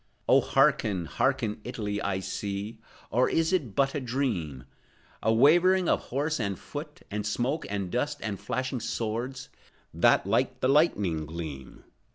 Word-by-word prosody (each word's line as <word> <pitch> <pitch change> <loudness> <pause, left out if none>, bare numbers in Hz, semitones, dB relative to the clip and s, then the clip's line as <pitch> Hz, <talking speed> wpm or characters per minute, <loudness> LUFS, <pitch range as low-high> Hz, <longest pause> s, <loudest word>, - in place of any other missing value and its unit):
Oh, - - +6
hearken, 95 -5 +2
hearken, 115 - 0
Italy! 105 -4 -3
I 95 -1 -1
see,— 100 +3 -4 0.3
Or 125 +2 +3
is 165 +2 +1
it 135 - 0
but 135 -1 +2
a - - -1
dream?— 115 - -2 0.6
A 110 - +2
wavering 175 +9 +5
of - - +1
horse 145 +4 -1
and 100 -4 -2
foot, - - -8
And 105 +1 -2
smoke, 125 +9 -1
and 100 -3 -3
dust, 135 +4 -1
and 100 -3 -3
flashing 130 +5 -2
swords, 120 +4 -3 0.4
That - - +4
like - - +1
the 130 - +1
lightning 100 - +2
gleam. 75 -5 -7
115 Hz, 150 wpm, -28 LUFS, 100-135 Hz, 0.6 s, Oh